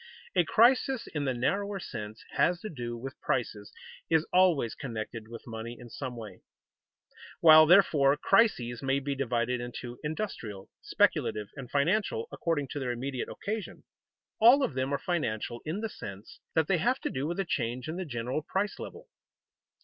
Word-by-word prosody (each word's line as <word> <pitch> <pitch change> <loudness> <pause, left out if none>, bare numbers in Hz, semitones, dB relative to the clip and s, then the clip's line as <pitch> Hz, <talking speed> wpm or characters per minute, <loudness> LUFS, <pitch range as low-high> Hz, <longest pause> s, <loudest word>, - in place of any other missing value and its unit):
A - - +5
crisis 255 +2 +3
in 145 -2 -3
the 130 - +1
narrower 200 +11 -1
sense 110 - -7
has 175 0 +2
to 215 - -6
do 120 -5 -5
with 135 +3 -8
prices 105 -5 -2 0.4
is 160 -1 +3
always 180 -10 +4
connected 115 -3 -6
with 115 0 -10
money 115 +1 -6
in 120 -2 -12
some 130 -3 -5
way. 105 -5 -9 1.0
While, 155 -1 +9
therefore, 150 -6 +5
crises 125 - +2
may 135 0 +1
be 140 +1 -2
divided 125 -2 -1
into 120 0 -7
industrial, 150 - -5
speculative, 105 -1 +1
and 135 -4 -8
financial, 205 - +1
according 145 -5 -1
to 145 - -4
their 130 -3 -2
immediate 130 +2 -4
occasion, 215 0 -5 0.6
all 245 +5 +7
of 180 - 0
them 130 +1 -1
are 140 - +1
financial 120 - -2
in 165 +7 -3
the 225 - -1
sense 100 - -9 0.2
that 160 -2 +4
they 185 -3 +2
have 250 +9 +1
to - - -2
do 135 +2 -2
with 170 +3 -3
a 195 - 0
change 125 -5 -2
in 160 +2 -4
the 185 - -2
general 125 +1 -3
price 195 +6 -2
level. - - -9
140 Hz, 170 wpm, -29 LUFS, 120-180 Hz, 1.0 s, While